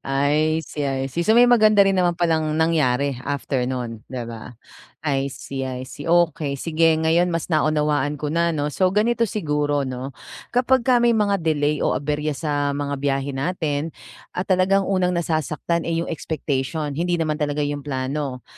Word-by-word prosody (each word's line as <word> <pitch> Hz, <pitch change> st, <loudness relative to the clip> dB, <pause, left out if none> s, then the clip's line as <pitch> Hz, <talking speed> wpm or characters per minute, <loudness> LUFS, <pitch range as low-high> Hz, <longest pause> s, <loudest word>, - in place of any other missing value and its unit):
I 150 Hz, +4 st, +1 dB
see, 145 Hz, +1 st, -4 dB
I 135 Hz, 0 st, -1 dB
see. 170 Hz, -, -1 dB
So, 220 Hz, +6 st, +3 dB
may 245 Hz, -, +8 dB
maganda 215 Hz, -4 st, +5 dB
rin 195 Hz, -, +3 dB
naman 175 Hz, -2 st, +2 dB
pa 175 Hz, -, +1 dB
lang 160 Hz, -2 st, +1 dB
nangyari 145 Hz, -4 st, +2 dB
after 135 Hz, -2 st, -2 dB
nun, 120 Hz, -4 st, -4 dB
'di 125 Hz, -2 st, -5 dB
ba? 115 Hz, 0 st, -9 dB, 0.5 s
I 140 Hz, -3 st, 0 dB
see, 135 Hz, -1 st, -5 dB
I 130 Hz, -1 st, -5 dB
see, 145 Hz, -, -9 dB
okey. 165 Hz, -4 st, +2 dB
Sige, 165 Hz, 0 st, +3 dB
ngayon 165 Hz, +2 st, +3 dB
mas 165 Hz, 0 st, -2 dB
naunawaan 150 Hz, -2 st, +1 dB
ko 150 Hz, -, -2 dB
na 170 Hz, +1 st, +1 dB
'no. 145 Hz, 0 st, -1 dB
So 185 Hz, +6 st, +1 dB
ganito 230 Hz, +2 st, +2 dB
siguro 150 Hz, -7 st, -1 dB
'no, 130 Hz, +1 st, -5 dB, 0.4 s
kapagka 250 Hz, 0 st, +3 dB
may 240 Hz, -, +5 dB
mga 200 Hz, -4 st, +1 dB
delay 150 Hz, -2 st, +1 dB
o -, -, +1 dB
aberya 150 Hz, +2 st, -2 dB
sa 145 Hz, -2 st, -1 dB
mga 145 Hz, 0 st, -2 dB
biyahe 140 Hz, 0 st, 0 dB
natin 155 Hz, 0 st, -2 dB, 0.5 s
at 180 Hz, -, -2 dB
talagang 190 Hz, +1 st, +3 dB
unang 185 Hz, -2 st, +1 dB
nasasaktan, 165 Hz, 0 st, -1 dB
eh, 165 Hz, 0 st, 0 dB
yung -, -, -6 dB
expectation, 150 Hz, -1 st, -3 dB
hindi 175 Hz, +3 st, 0 dB
naman 155 Hz, -2 st, 0 dB
talaga 145 Hz, 0 st, 0 dB
yung 145 Hz, 0 st, -4 dB
plano. 135 Hz, -1 st, -3 dB
150 Hz, 175 wpm, -22 LUFS, 140-170 Hz, 0.5 s, may